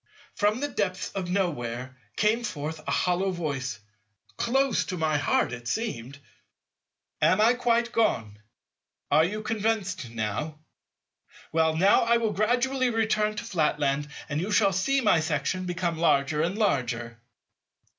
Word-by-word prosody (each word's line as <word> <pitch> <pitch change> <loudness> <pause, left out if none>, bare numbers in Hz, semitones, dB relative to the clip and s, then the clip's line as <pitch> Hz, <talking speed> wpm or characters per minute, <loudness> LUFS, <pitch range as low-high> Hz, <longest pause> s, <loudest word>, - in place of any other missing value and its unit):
For 205 -1 +2
from 220 +5 -4
the 290 - 0
depths 195 -8 -2
of 185 -2 -4
nowhere 130 -10 -2 0.2
came 220 +3 +2
forth 160 -6 -4
a - - -1
hollow 180 +2 +1
voice—close 130 - -2
to 185 - -4
my 155 -2 +1
heart 130 - +1
it 120 -1 -7
seemed—"Am 140 - -4
I 225 +3 +5
quite 235 -1 +1
gone? 110 - 0 0.7
Are 155 +2 +6
you 210 +5 -2
convinced 215 - -1
now? 115 +8 -3 0.9
Well, 160 0 +2
now 195 +4 +5
I 235 0 +3
will 225 -2 -1
gradually 250 +4 +1
return 215 -2 +1
to - - -4
Flatland 150 -7 0 0.2
and 145 +2 -2
you 190 - -3
shall 200 -2 +3
see 275 +9 +1
my 210 -8 +4
section 160 +3 -1
become 175 -2 -2
larger 150 -2 +2
and 175 +5 -1
larger." 120 - -1
175 Hz, 135 wpm, -27 LUFS, 140-215 Hz, 0.9 s, Are